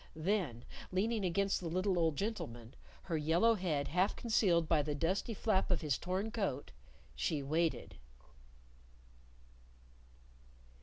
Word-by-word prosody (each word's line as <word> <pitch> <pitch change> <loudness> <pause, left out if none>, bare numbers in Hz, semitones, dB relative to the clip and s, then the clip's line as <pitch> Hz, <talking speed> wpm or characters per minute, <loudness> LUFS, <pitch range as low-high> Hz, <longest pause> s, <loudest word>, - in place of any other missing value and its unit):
Then 160 - -1 0.3
leaning 210 +3 0
against 195 +2 +1
the 175 - -4
little 185 +2 +1
old 160 -2 +2
gentleman, 125 - -4 0.3
her 170 - -2
yellow 165 +9 +3
head 165 -9 -1
half 180 +5 +2
concealed 185 -8 +2
by 155 -2 +3
the 145 0 -2
dusty 190 +9 -1
flap 195 -2 +1
of 180 -4 +1
his 150 -4 0
torn 190 +5 -2
coat, 195 - -2 0.4
she 140 - -1
waited. 160 +4 -1
175 Hz, 120 wpm, -35 LUFS, 155-200 Hz, 0.4 s, yellow